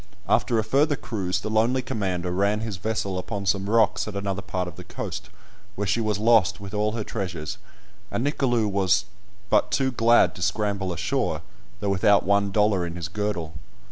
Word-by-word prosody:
After 120 Hz, -, +2 dB
a 110 Hz, -, +2 dB
further 140 Hz, +7 st, +2 dB
cruise 95 Hz, -9 st, -3 dB
the -, -, -4 dB
lonely 120 Hz, +4 st, +2 dB
commander 90 Hz, -6 st, -2 dB
ran 100 Hz, +3 st, +1 dB
his 110 Hz, -4 st, -4 dB
vessel 100 Hz, -2 st, -2 dB
upon 100 Hz, +1 st, -4 dB
some 100 Hz, +1 st, +1 dB
rocks 110 Hz, -1 st, +3 dB
at 105 Hz, -, -6 dB
another 100 Hz, -1 st, -2 dB
part 90 Hz, -2 st, -3 dB
of 85 Hz, -, -8 dB
the 90 Hz, -, -9 dB
coast, -, -, -6 dB, 0.5 s
where 105 Hz, -, -2 dB
she 105 Hz, +4 st, +1 dB
was 105 Hz, -2 st, 0 dB
lost 105 Hz, -4 st, +4 dB
with 100 Hz, 0 st, -8 dB
all 105 Hz, 0 st, 0 dB
her 115 Hz, -2 st, -2 dB
treasures, 90 Hz, -8 st, -4 dB, 0.5 s
and 120 Hz, -, -2 dB
Nicolou 125 Hz, -6 st, +1 dB
was 100 Hz, -1 st, +2 dB, 0.5 s
but 105 Hz, -, +4 dB
too 130 Hz, +5 st, +1 dB
glad 120 Hz, -1 st, +4 dB
to -, -, -10 dB
scramble 100 Hz, -1 st, 0 dB
ashore, 85 Hz, -, -1 dB, 0.4 s
though 100 Hz, -, 0 dB
without 100 Hz, +1 st, +4 dB
one 100 Hz, +1 st, +3 dB
dollar 105 Hz, -2 st, +2 dB
in 85 Hz, 0 st, -4 dB
his 85 Hz, -2 st, -5 dB
girdle. 95 Hz, -4 st, -3 dB
100 Hz, 185 wpm, -25 LUFS, 95-110 Hz, 0.5 s, lost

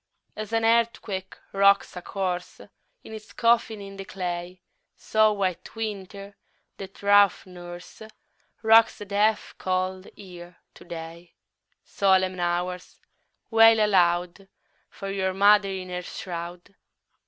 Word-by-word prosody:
2. -, -, -5 dB
As 215 Hz, 0 st, -8 dB
an 225 Hz, 0 st, +1 dB
earthquake 225 Hz, -4 st, 0 dB, 0.2 s
rocks 200 Hz, 0 st, +3 dB
a 180 Hz, -, -6 dB
corse 180 Hz, -1 st, -4 dB, 0.4 s
In -, -, -11 dB
its 215 Hz, -2 st, -11 dB
coffin 230 Hz, -2 st, +2 dB
in 195 Hz, 0 st, -10 dB
the 195 Hz, -, -6 dB
clay, 180 Hz, -1 st, -5 dB, 0.4 s
So 215 Hz, 0 st, +2 dB
White 195 Hz, -2 st, -3 dB
Winter, 200 Hz, -2 st, -6 dB, 0.4 s
that 195 Hz, 0 st, -11 dB
rough 205 Hz, -1 st, +4 dB
nurse, 175 Hz, 0 st, -11 dB, 0.6 s
Rocks 225 Hz, +1 st, +5 dB
the 205 Hz, -, -8 dB
death 210 Hz, +2 st, 0 dB
cold 185 Hz, 0 st, -2 dB
Year 175 Hz, -3 st, -12 dB, 0.2 s
to -, -, -16 dB
day; 170 Hz, 0 st, -9 dB, 0.5 s
_10 -, -, -36 dB
Solemn 190 Hz, -2 st, +1 dB
Hours! 175 Hz, +1 st, -3 dB, 0.5 s
wail 225 Hz, 0 st, +6 dB
aloud 180 Hz, -2 st, +1 dB, 0.4 s
For 195 Hz, -1 st, -7 dB
your 190 Hz, -1 st, -2 dB
mother 200 Hz, 0 st, +5 dB
in 190 Hz, -1 st, -6 dB
her 180 Hz, 0 st, -4 dB
shroud. 175 Hz, +1 st, -8 dB
195 Hz, 130 wpm, -25 LUFS, 180-205 Hz, 0.6 s, wail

